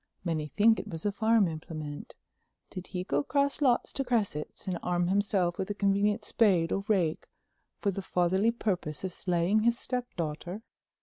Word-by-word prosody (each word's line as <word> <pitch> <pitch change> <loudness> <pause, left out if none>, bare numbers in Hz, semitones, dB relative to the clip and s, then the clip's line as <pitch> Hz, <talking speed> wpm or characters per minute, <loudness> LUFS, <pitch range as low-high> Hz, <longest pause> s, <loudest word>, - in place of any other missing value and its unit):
Many 160 -4 -1
think 220 +7 +4
it - - -6
was 165 -3 -7
a 205 - +2
farm 220 -1 +3
implement. 155 -2 -7 0.6
Did 185 -1 -7
he 180 -1 -4
go 145 -5 0
across 280 - 0
lots 255 -4 +2
to 275 - -1
Cresset's 210 - -2
and 180 -2 -2
arm 175 0 0
himself 195 -3 +1
with 190 - -2
a 205 - -2
convenient 205 +1 +1
spade 185 -7 +3
or 195 - 0
rake 180 -7 +1 0.5
for 200 - 0
the 195 - -4
fatherly 190 +4 +2
purpose 190 -10 -2
of 185 -2 -3
slaying 180 +2 +1
his 235 +2 +2
stepdaughter?" 185 - -4
190 Hz, 170 wpm, -29 LUFS, 170-215 Hz, 0.6 s, think